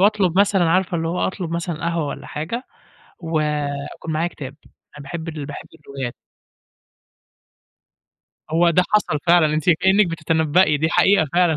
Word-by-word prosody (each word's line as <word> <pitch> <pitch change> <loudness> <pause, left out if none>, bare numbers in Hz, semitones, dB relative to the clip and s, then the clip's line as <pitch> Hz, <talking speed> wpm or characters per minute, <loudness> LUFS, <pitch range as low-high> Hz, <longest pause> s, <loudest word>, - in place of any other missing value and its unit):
واطلب 195 -4 +3
مثلًا 200 -2 +3
عارفة 180 0 +1
اللي 165 0 -2
هو 175 +2 -2
أطلب 185 -3 -4
مثلًا 170 0 -3
قهوة 170 -2 -1
والَّا - - -7
حاجة، 165 +12 -4 0.6
و 165 -2 -1 0.5
يكون 160 - -6
معايا 160 +3 0
كتاب 140 -4 -9
أنا 145 - -16
باحب 160 +4 -6
باحب 150 -3 -7
الروايات. 135 -3 -7 2.4
هو 170 +2 +4
ده 180 +2 +3
حصل 205 -8 +2
فعلًا، 170 -3 +4
أنتِ 155 +3 0
كأنِك 190 +4 +4
بتتنبئي 160 -1 +2
دي 160 +2 0
حقيقة 190 -1 +4
فعلًا، 175 -2 +3
165 Hz, 145 wpm, -21 LUFS, 155-180 Hz, 2.4 s, هو